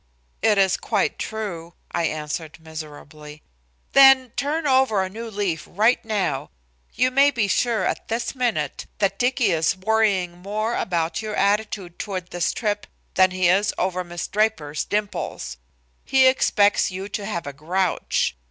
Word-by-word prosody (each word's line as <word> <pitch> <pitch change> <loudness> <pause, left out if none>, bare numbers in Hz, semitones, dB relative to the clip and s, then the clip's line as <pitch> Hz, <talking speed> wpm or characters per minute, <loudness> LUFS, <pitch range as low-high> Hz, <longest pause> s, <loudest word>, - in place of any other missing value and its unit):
"It 215 0 +3
is 190 -1 +3
quite 210 -4 -1
true," 175 -6 -5 0.2
I 170 - 0
answered 155 +1 -4
miserably. 155 -1 -10 0.5
"Then 270 -2 +7
turn 295 +5 -1
over 260 -7 +3
a 190 - -4
new 230 +3 -7
leaf 195 -7 -2
right 220 +6 +2
now. 200 -11 -2 0.5
You 255 +3 +2
may 275 +2 +5
be 235 -7 0
sure 220 -1 +1
at - - -2
this 230 +1 -2
minute 230 - -2
that 195 -1 0
Dicky 245 -4 +2
is 165 +2 +1
worrying 190 -4 +1
more 215 +5 -2
over 170 -2 -1
your 215 -1 -3
attitude 200 -3 0
toward 185 -3 -5
this 175 -1 0
trip 205 -3 -2 0.3
than 185 0 +5
he 185 -1 +1
is 195 +4 +2
over 185 0 -1
Miss 175 0 -5
Draper's 195 -9 0
dimples. 195 - -3 0.5
He 265 -1 +4
expects 205 -6 +3
you 190 +1 -6
to 205 0 -4
have 175 -6 -3
a 145 - -6
grouch. 175 - -1
200 Hz, 150 wpm, -23 LUFS, 175-220 Hz, 0.5 s, Then